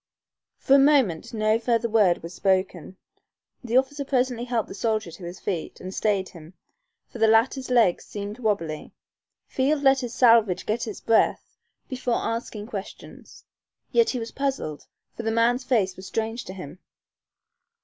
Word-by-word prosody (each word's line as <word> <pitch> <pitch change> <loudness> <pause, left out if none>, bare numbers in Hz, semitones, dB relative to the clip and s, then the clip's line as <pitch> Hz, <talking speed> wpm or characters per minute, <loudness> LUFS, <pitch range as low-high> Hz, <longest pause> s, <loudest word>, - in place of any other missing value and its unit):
For 270 - +1
a - - +5
moment 270 - +3
no 215 0 +1
further 235 0 +1
word 210 -7 +3
was 170 +1 -8
spoken. 185 -1 -1 0.7
The 240 0 +1
officer 280 +2 0
presently 250 -3 0
helped 235 -3 -1
the - - -8
soldier 215 -3 -1
to 170 +2 -10
his 175 +2 -8
feet 175 -6 -4
and 185 +1 -7
stayed 200 -3 0
him, 165 +1 -14 0.5
for 240 - -10
the 225 - +4
latter's 240 +4 +2
legs 230 -8 +3
seemed 205 +2 -7
wobbly. 185 -9 -2 0.5
Field 280 +2 0
let 270 -1 +5
his 245 -2 -5
salvage 225 -7 +4
get 230 +2 -2
its 215 - -7
breath 225 - +1 0.3
before 250 -2 -2
asking 230 -2 -3
questions. 210 -3 -10 0.5
Yet 465 -1 +3
he 255 - -2
was 230 -1 -5
puzzled, 270 - -3 0.3
for - - -5
the 225 - -2
man's 235 +3 +2
face 205 -8 +1
was 190 +1 -10
strange 225 +2 -3
to 185 - -8
him. 180 -2 -9
225 Hz, 160 wpm, -25 LUFS, 190-245 Hz, 0.7 s, a